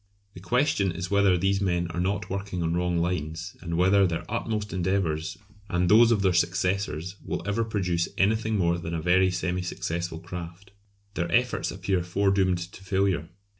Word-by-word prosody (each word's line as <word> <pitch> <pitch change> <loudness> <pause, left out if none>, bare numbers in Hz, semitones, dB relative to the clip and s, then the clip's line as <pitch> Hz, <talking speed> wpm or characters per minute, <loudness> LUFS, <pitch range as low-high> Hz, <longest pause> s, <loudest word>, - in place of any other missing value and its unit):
The 90 - -10
question 105 -2 +1
is 85 +2 -5
whether 100 -2 +4
these 95 +2 +1
men 90 -3 +1
are 85 - -4
not 95 +3 -1
working 95 -2 -3
on 80 0 0
wrong 90 0 0
lines, 85 +1 -2
and 85 -2 -3
whether 95 +2 +4
their 80 -2 -3
utmost 110 -2 -3
endeavours 90 -3 -1 0.3
and 90 0 +1
those 115 +3 +7
of 105 -4 +2
their 95 -2 +3
successors 90 0 0
will - - -4
ever 110 +3 +1
produce 90 -6 -1
anything 110 +2 +2
more 85 -2 +1
than 85 0 -4
a - - -1
very 95 +3 +3
semi 90 0 -1
successful 85 -1 -3
craft. 90 +3 -8 0.4
Their 85 -3 -2
efforts 125 +4 +1
appear 95 0 -1
foredoomed 95 +1 +1
to 95 - -13
failure. 95 -4 0
90 Hz, 170 wpm, -26 LUFS, 85-100 Hz, 0.4 s, those